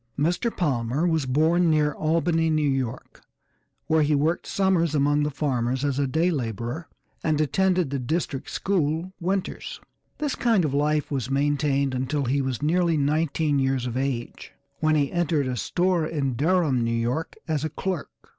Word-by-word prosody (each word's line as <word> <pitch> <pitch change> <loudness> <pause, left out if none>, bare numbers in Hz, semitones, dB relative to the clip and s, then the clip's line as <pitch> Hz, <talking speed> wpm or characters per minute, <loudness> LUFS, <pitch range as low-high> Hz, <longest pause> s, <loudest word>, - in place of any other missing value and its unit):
Mr. 175 - +1
Palmer 135 -2 0
was 160 -5 +1
born 160 +6 +3
near 150 -1 +3
Albany, 165 +1 +1
New 155 -2 +2
York, 130 -3 -3 0.6
where 160 0 +3
he 150 0 +2
worked 155 +4 0
summers 180 -5 +1
among 145 +1 +2
the 150 - +1
farmers 130 -2 -1
as 140 -1 0
a 140 - +1
day 160 +7 +1
laborer, 120 - -3 0.4
and 155 -2 +1
attended 180 0 +1
the 140 - -1
district 140 +1 -2
school 170 -1 -1
winters. 185 +2 -3 0.4
This 295 -2 -1
kind 225 -8 +2
of 140 - -2
life 150 +1 +1
was 130 -3 -2
maintained 140 -1 +1
until 130 +3 -1
he 135 +3 +1
was 130 -1 -3
nearly 170 +1 +2
nineteen 150 0 +1
years 135 -2 0
of 125 -1 -4
age 130 -3 -3 0.3
when 155 0 +2
he 140 -2 +1
entered 165 -4 +1
a 130 -1 -2
store 175 - +1
at 140 -6 -1
Durham, 150 -3 +2
New 115 0 0
York, 125 +8 -2
as 155 -3 -1
a 155 - -1
clerk. 175 +1 -3
150 Hz, 165 wpm, -25 LUFS, 135-165 Hz, 0.6 s, born